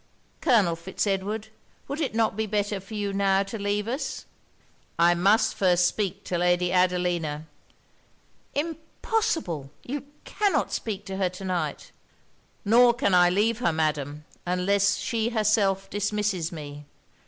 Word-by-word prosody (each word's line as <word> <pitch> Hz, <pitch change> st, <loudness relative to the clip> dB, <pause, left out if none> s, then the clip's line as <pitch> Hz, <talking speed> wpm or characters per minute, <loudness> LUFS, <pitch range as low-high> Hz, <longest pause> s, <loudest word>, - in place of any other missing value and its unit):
Colonel 210 Hz, -, +3 dB
Fitz 170 Hz, +5 st, -3 dB
Edward, 205 Hz, +2 st, -2 dB, 0.4 s
would 290 Hz, +3 st, -4 dB
it 270 Hz, -7 st, -2 dB
not 225 Hz, -2 st, +2 dB
be 220 Hz, +1 st, -1 dB
better 205 Hz, -1 st, -1 dB
for 195 Hz, +3 st, -10 dB
you 205 Hz, -1 st, -2 dB
now 195 Hz, 0 st, +2 dB
to 200 Hz, +3 st, -7 dB
leave 205 Hz, +1 st, -1 dB
us?' 260 Hz, +6 st, -4 dB, 0.7 s
'I 170 Hz, +1 st, +5 dB
must 195 Hz, +6 st, +3 dB
first 180 Hz, -2 st, +3 dB
speak 195 Hz, +1 st, -1 dB
to 175 Hz, -, -2 dB
Lady 180 Hz, 0 st, +2 dB
Adelina.' 175 Hz, -4 st, +1 dB, 1.1 s
'Impossible! 315 Hz, -, -2 dB
you 280 Hz, +2 st, -5 dB, 0.2 s
cannot 410 Hz, -2 st, 0 dB
speak 205 Hz, -3 st, -3 dB
to 190 Hz, 0 st, -5 dB
her 190 Hz, -2 st, +1 dB
to 185 Hz, +2 st, -9 dB
night.' 175 Hz, -6 st, -3 dB, 0.7 s
'Nor 235 Hz, +3 st, +6 dB
can 240 Hz, -6 st, +1 dB
I 180 Hz, -1 st, +6 dB
leave 215 Hz, +5 st, +1 dB
her, 235 Hz, -8 st, +2 dB
Madam, 150 Hz, -2 st, -2 dB, 0.2 s
unless 185 Hz, +2 st, +2 dB
she 230 Hz, -1 st, -1 dB
herself 210 Hz, -4 st, +1 dB
dismisses 205 Hz, -4 st, -1 dB
me. 145 Hz, -2 st, -8 dB
195 Hz, 140 wpm, -26 LUFS, 175-220 Hz, 1.1 s, Nor